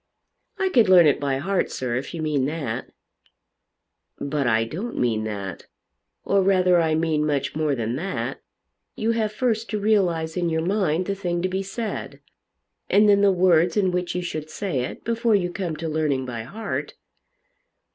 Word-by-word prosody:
"I 385 -1 +1
could 235 - +4
learn 180 -3 +8
it 145 - +3
by 140 -2 0
heart, 190 +7 0
sir, 125 -2 -3
if 125 - -3
you 160 - -4
mean 145 -4 +1
that." 145 -7 -4 1.3
"But 140 -1 -1
I 110 -1 +3
don't 185 - -5
mean 110 -3 0
that; 100 -4 -6 0.6
or 200 0 +3
rather 185 -2 +4
I 160 -1 +1
mean 160 -1 +1
much 140 -3 -1
more 155 -2 +1
than 115 0 -2
that. 190 +6 -4 0.5
You 225 +1 0
have 220 -2 0
first 225 -1 -1
to 210 0 -2
realise 180 -7 +1
in 175 -2 0
your 160 0 -1
mind 185 -3 +1
the 200 - -1
thing 175 -3 -2
to - - +2
be 190 +1 -2
said, 215 +3 -5 0.7
and 210 +1 +5
then 200 -1 +5
the 200 -1 +5
words 180 -1 +3
in 190 -3 +3
which 180 0 -2
you 180 - -1
should 155 -3 -5
say 165 -3 -2
it, - - -8
before 230 -1 +1
you 180 -3 0
come 175 -4 -3
to 165 +2 -5
learning 150 -4 0
by 115 -3 -5
heart." 215 - -5
175 Hz, 180 wpm, -24 LUFS, 145-195 Hz, 1.3 s, learn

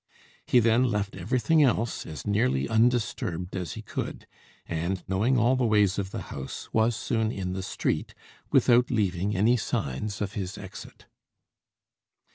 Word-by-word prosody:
He - - +4
then 115 +2 +4
left 105 -4 -1
everything 120 - +2
else 120 -4 +1
as 80 - -7
nearly 100 - +1
undisturbed 110 -7 0
as 90 -4 -3
he - - -8
could; - - -5 0.4
and, 85 +3 -2
knowing 110 +8 +2
all 120 +2 +4
the 130 - 0
ways 105 -3 +3
of 95 -1 -3
the - - -5
house, 70 -1 -6
was 110 +1 +3
soon 110 -1 -1
in 90 -4 -3
the 95 - -3
street, 95 - -2 0.3
without 120 +1 +4
leaving 100 -1 0
any 115 +6 +4
signs 100 - -3
of 105 -1 -3
his 95 -3 -4
exit. - - -10
105 Hz, 150 wpm, -27 LUFS, 95-120 Hz, 0.4 s, He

